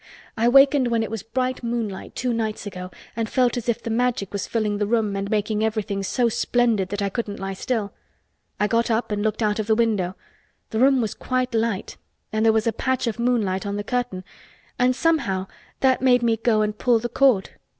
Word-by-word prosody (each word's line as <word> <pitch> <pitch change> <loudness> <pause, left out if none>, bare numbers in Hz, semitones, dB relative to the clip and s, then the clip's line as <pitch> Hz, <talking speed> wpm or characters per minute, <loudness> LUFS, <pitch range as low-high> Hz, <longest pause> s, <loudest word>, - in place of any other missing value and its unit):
I 230 +1 +2
wakened 275 0 +6
when 230 -1 +1
it 220 - -5
was 225 -3 -3
bright 255 +3 -2
moonlight 230 -5 -4
two 250 -1 -1
nights 220 -2 -2
ago 180 -2 -6 0.3
and 225 -1 -2
felt 250 -2 +2
as 245 -1 -3
if 235 - -1
the 230 - -3
Magic 240 -4 0
was 200 -1 -3
filling 210 -3 -1
the 205 - 0
room 215 -3 +1
and 195 0 -3
making 215 0 0
everything 215 -3 -1
so 240 +5 +1
splendid 230 -4 +1
that 205 0 -2
I 200 - 0
couldn't 205 -1 -4
lie 195 0 -4
still. 210 +1 -2 0.7
I 210 - +3
got 230 +2 +1
up 225 0 0
and 205 0 -1
looked 215 +1 -1
out 210 0 +1
of 215 - -2
the 220 - +3
window. 210 -6 +1 0.6
The 220 - -1
room 265 0 +5
was 220 -3 -2
quite 255 -1 -2
light 225 -3 -1 0.4
and 215 0 +1
there 225 - +6
was 220 -1 +1
a 230 - +1
patch 260 -1 -1
of 230 -1 -3
moonlight 225 -6 +1
on 200 -1 -3
the 205 - -3
curtain 245 -5 -2 0.6
and 250 +1 +3
somehow 260 - +1 0.4
that 260 -2 +3
made 250 -2 +4
me 230 -1 +3
go 225 -1 +2
and 210 0 -2
pull 240 +2 +3
the 235 +2 -2
cord. 240 -5 +2
225 Hz, 215 wpm, -23 LUFS, 205-245 Hz, 0.7 s, wakened